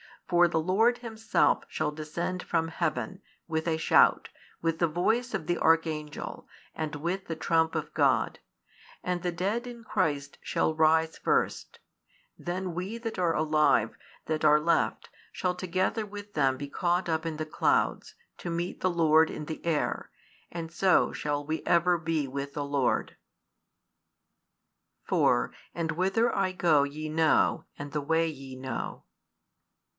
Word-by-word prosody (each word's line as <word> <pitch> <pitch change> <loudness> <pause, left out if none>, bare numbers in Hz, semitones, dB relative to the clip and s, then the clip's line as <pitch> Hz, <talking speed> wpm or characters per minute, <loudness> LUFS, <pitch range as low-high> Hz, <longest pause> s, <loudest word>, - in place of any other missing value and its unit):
For 175 -1 +5
the 160 -1 0
Lord 225 +8 +2
Himself 225 -2 +1
shall 155 -1 -2
descend 160 +4 -4
from 165 -2 -1
heaven, 170 +4 -2 0.3
with 160 0 -1
a 160 -1 +1
shout, 160 - +4 0.3
with 165 -1 0
the 170 - +3
voice 220 +10 0
of - - -2
the 175 - -1
archangel, 160 -2 0 0.3
and 155 -1 -4
with 175 +6 -3
the 165 - -4
trump 160 0 +1
of 155 -1 -3
God: 140 -4 +2 0.6
and 180 -1 -1
the 175 0 -1
dead 205 +8 -1
in 235 -1 -9
Christ 145 -9 -1
shall 160 - 0
rise 160 +1 +3
first: - - -1 0.6
then 180 0 -4
we 185 +6 -4
that 225 -4 -5
are 170 -2 +2
alive, 155 0 +2 0.3
that 155 -1 -1
are 150 0 +6
left, 170 +3 0 0.2
shall 180 -1 0
together 185 +4 -1
with 205 0 -9
them 135 -3 +2
be 140 +1 -7
caught 175 +3 0
up 160 0 0
in 165 -1 -2
the 155 0 -3
clouds, 155 - 0 0.2
to 175 - -6
meet 170 +1 -3
the 185 - +1
Lord 160 -2 +4
in 150 - -6
the 160 +1 -6
air: 160 -3 -1 0.4
and 165 -1 -6
so 185 +2 +3
shall 145 -1 -2
we 155 +2 -2
ever 175 0 +3
be 160 -3 -1
with 140 +1 -5
the 145 - -3
Lord. 140 -3 0 1.9
4 - - +2 0.2
And 165 -1 -1
whither 195 +8 +1
I 190 -1 0
go 165 -6 +4
ye 155 +2 -4
know, 160 0 +2
and 145 0 -7
the 150 0 -1
way 160 +3 +1
ye 135 -3 -9
know. 130 0 -5
165 Hz, 155 wpm, -28 LUFS, 155-180 Hz, 1.9 s, are